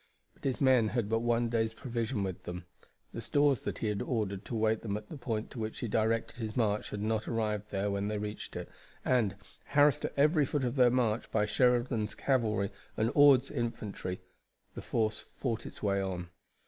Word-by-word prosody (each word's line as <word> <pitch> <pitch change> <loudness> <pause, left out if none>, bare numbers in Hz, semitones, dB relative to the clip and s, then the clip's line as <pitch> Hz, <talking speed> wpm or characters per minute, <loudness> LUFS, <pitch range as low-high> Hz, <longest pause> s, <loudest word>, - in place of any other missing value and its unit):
But - - -16
his 130 -2 0
men 130 -5 +5
had 115 -2 -1
but 115 0 +2
one 120 0 +1
day's 110 -1 0
provision 115 -3 -2
with 95 -2 -4
them. 90 0 -6 0.5
The - - -5
stores 145 -4 +2
that - - -4
he 110 - -2
had 105 -1 -1
ordered 105 -5 -2
to 120 - -4
await 110 0 +2
them 105 -2 -2
at 105 0 -10
the - - -7
point 115 -5 -3
to 125 - -7
which 110 0 -3
he 120 - -3
directed 115 +3 0
his 110 0 -4
march 105 -3 +1
had 105 0 -4
not 110 0 0
arrived 105 -2 -1
there 100 0 -1
when 100 0 -1
they 105 0 -1
reached 105 0 -5
it, - - -4 0.4
and, 115 -7 +2 0.3
harassed 145 0 +4
at - - -5
every 150 0 +4
foot 145 -1 -1
of 120 +1 -1
their 125 -2 +6
march 120 -3 +1
by 105 -1 +2
Sheridan's 120 -1 +2
cavalry 110 -7 +1 0.3
and 110 +2 +2
Ord's 145 -3 +6
infantry, 110 -7 -3 0.5
the - - -6
force 110 -1 0 0.2
fought 115 -4 -2
its - - -11
way 100 -1 +2
on. 90 -2 -4
110 Hz, 200 wpm, -31 LUFS, 105-125 Hz, 0.5 s, their